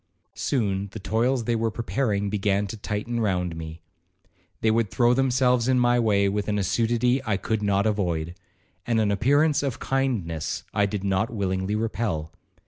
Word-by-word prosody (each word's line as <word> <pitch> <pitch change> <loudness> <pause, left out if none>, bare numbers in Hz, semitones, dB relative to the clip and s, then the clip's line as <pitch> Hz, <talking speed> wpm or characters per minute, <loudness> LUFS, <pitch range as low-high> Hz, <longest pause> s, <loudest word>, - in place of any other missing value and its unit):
Soon 100 -7 -1
the 110 - -6
toils 120 +5 0
they 115 +1 0
were 115 0 0
preparing 110 -3 -1
began 100 -1 +1
to 100 - -6
tighten 105 +3 -3
round 90 -6 0
me. 80 0 -8 0.8
They 110 - +3
would 115 -2 +1
throw 120 +3 +3
themselves 125 -2 +2
in 130 -1 +3
my 120 0 +3
way 100 -3 +3
with 100 +1 -1
an 105 -1 0
assiduity 120 +6 +1
I 110 -5 0
could 110 +2 -2
not 100 0 +1
avoid, 85 -6 -1 0.5
and 115 -2 +2
an 105 -2 +2
appearance 145 +8 +3
of 135 -4 -2
kindness 115 - -2
I 105 -1 +2
did 100 -1 -4
not 95 +2 +1
willingly 95 -2 -1
repel. 105 -8 -2
110 Hz, 165 wpm, -25 LUFS, 100-120 Hz, 0.8 s, They